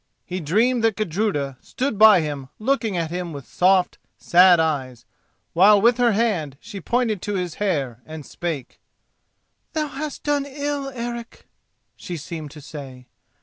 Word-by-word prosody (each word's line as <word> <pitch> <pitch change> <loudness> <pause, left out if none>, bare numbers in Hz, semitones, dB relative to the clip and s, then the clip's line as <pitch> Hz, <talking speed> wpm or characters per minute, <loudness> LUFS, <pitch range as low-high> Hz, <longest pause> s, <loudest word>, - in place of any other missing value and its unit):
He 185 +1 -4
dreamed 225 +10 +1
that 225 -2 +3
Gudruda 170 -9 -1
stood 255 -5 -3
by 215 -4 +8
him 145 -4 -5
looking 225 -4 0
at 165 -1 -2
him 175 -1 -4
with 140 -3 -8
soft, 185 0 +2 0.2
sad 180 0 +6
eyes, 135 -7 -2 0.5
while 200 +4 +6
with 235 +3 +4
her 240 -2 +3
hand 185 - 0
she 200 - -9
pointed 235 -5 0
to 205 -1 -3
his 180 -3 -2
hair, 140 - -1
and 155 -2 -9
spake. 160 -7 -5 0.9
"Thou 305 -2 -1
hast 290 +1 -6
done 290 -1 0
ill, 285 0 -3
Eric," 235 -2 -7 0.5
she 175 - -6
seemed 155 0 -7
to 150 +1 -12
say. 135 -4 -10
185 Hz, 150 wpm, -22 LUFS, 155-235 Hz, 0.9 s, by